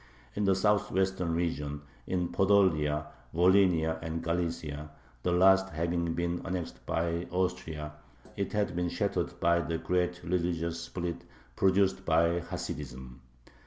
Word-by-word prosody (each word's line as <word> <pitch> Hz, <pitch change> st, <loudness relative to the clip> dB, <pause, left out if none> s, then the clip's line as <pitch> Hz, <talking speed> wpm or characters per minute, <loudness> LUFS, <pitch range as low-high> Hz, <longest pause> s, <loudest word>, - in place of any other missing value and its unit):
In 105 Hz, -, -1 dB
the 95 Hz, -1 st, +4 dB
southwestern 95 Hz, -3 st, +1 dB
region, 75 Hz, -4 st, -2 dB, 0.2 s
in 90 Hz, -2 st, 0 dB
Podolia, 80 Hz, -7 st, +3 dB, 0.3 s
Volhynia, 90 Hz, -3 st, +4 dB
and 80 Hz, 0 st, -4 dB
Galicia, 85 Hz, -3 st, -2 dB, 0.3 s
the 90 Hz, -, 0 dB
last 95 Hz, +2 st, +5 dB
having 85 Hz, +1 st, -1 dB
been 85 Hz, 0 st, -1 dB
annexed 90 Hz, -3 st, -4 dB
by 85 Hz, +1 st, -1 dB
Austria, 85 Hz, -4 st, -2 dB, 0.4 s
it 100 Hz, -, -2 dB
had 105 Hz, -4 st, 0 dB
been 90 Hz, 0 st, 0 dB
shattered -, -, -2 dB
by 85 Hz, 0 st, +3 dB
the 80 Hz, +1 st, -2 dB
great 90 Hz, +1 st, 0 dB
religious 85 Hz, -1 st, -1 dB
split 85 Hz, 0 st, -4 dB, 0.3 s
produced 95 Hz, 0 st, +3 dB
by 85 Hz, +1 st, +3 dB
Hasidism. 65 Hz, -6 st, -6 dB
85 Hz, 125 wpm, -30 LUFS, 80-95 Hz, 0.4 s, last